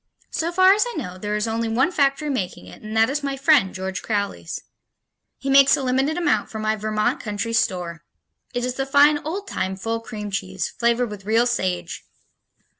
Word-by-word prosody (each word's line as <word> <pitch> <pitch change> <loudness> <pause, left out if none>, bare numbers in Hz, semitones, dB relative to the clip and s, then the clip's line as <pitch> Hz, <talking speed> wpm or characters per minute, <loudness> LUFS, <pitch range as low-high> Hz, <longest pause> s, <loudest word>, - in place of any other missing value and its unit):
So 330 +1 -1
far 375 +2 +6
as 420 - +3
I 480 - -6
know, 185 -10 -5
there 210 +2 -2
is 210 +1 -1
only 225 0 -1
one 255 +9 +2
factory 285 -1 +1
making 200 -10 -3
it - - -13
and 215 +1 -5
that 225 0 +5
is 285 +3 -2
my 275 -1 -3
friend, 275 -8 +4
George 190 0 -4
Crowley's. 200 - -3 0.7
He 270 - -8
makes 275 0 +6
a 275 - -3
limited 265 +5 +1
amount 335 -4 +1
for 220 - -7
my 215 0 0
Vermont 215 0 -1
Country 210 +1 -3
Store. 175 -6 -1 0.5
It 245 -1 -2
is 250 - -2
the 270 +1 -3
fine 290 +2 +5
old 380 +7 -5
time 190 - -2
full 225 +4 -3
cream 210 -3 -7
cheese, 190 -1 -2
flavored 235 -1 0
with 200 -2 -9
real 225 +3 +3
sage. 185 -7 -2
230 Hz, 195 wpm, -23 LUFS, 205-275 Hz, 0.7 s, far